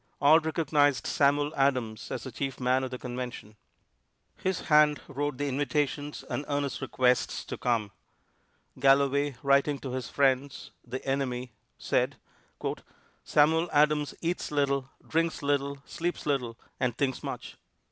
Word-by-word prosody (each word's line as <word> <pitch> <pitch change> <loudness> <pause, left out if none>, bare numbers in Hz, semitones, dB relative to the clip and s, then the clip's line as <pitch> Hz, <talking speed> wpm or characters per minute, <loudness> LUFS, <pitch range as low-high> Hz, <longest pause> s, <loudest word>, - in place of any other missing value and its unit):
All 150 +3 +7
recognized 150 -3 +1
Samuel 145 +1 +2
Adams 125 -5 0
as - - -4
the 130 - -7
chief 135 0 -4
man 130 +1 +2
of 130 - -3
the 125 - -5
Convention. 125 -4 -6 0.8
His 190 -1 -2
hand 150 -1 +4
wrote 145 -1 -3
the 145 - -1
invitations 145 +1 -1
and 145 - -3
earnest 145 -1 -2
requests 125 -1 +1
to - - -5
come. 115 -5 0 0.9
Galloway, 140 +1 +3
writing 140 +1 +3
to 130 - -5
his 130 -1 -4
friends, 135 0 0
the 125 +2 -6
enemy, 130 -2 -2 0.3
said: - - 0 1.1
"Samuel 160 +3 +3
Adams 150 0 +3
eats 175 +2 -2
little, 140 -2 0 0.2
drinks 165 -1 0
little, 140 -1 -1
sleeps 175 +1 -3
little 125 -6 -1 0.2
and 125 -2 0
thinks 135 -2 0
much. - - -6
140 Hz, 135 wpm, -29 LUFS, 130-145 Hz, 1.1 s, All